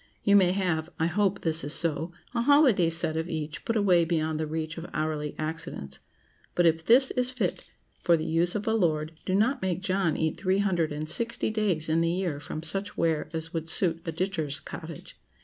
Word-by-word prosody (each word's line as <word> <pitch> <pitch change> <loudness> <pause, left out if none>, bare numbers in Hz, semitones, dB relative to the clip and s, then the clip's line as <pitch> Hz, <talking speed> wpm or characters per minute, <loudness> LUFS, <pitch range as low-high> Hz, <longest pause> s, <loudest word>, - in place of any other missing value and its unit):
You 200 - +4
may 185 -3 +5
have—I 170 -4 -1
hope 195 +2 +1
this 160 -1 +1
is 145 +3 0
so—a 170 +7 -2
holiday 255 - +5
set 165 -1 0
of 160 +2 -2
each, 155 -2 -5
put 230 - -1
away 185 -5 +4
beyond 160 -2 -1
the 155 - -2
reach 155 0 -4
of 165 - -8
hourly 155 -1 -2
accidents; 155 - -3 0.6
but 175 - +3
if 165 -1 +3
this 255 +7 +5
is 250 0 +1
fit 235 -9 -2 0.4
for 170 -1 +4
the 155 - -4
use 170 +3 +1
of 210 0 -2
a 220 - +2
lord, 155 -7 +1 0.2
do 185 - +1
not 225 +8 +2
make 185 -1 -1
John 185 -5 0
eat 160 -1 -1
three 190 0 +1
hundred 180 -6 +1
and 150 +1 -4
sixty 230 +6 0
days 200 -8 0
in 160 +1 +2
the 165 - +2
year 175 -4 -2
from 155 +2 -6
such 195 +5 -2
ware 160 -2 0
as 165 0 -4
would 165 -1 -3
suit 165 -1 +1
a 165 - -3
ditcher's 160 -4 -1
cottage. 160 -2 -9
170 Hz, 200 wpm, -27 LUFS, 160-195 Hz, 0.6 s, may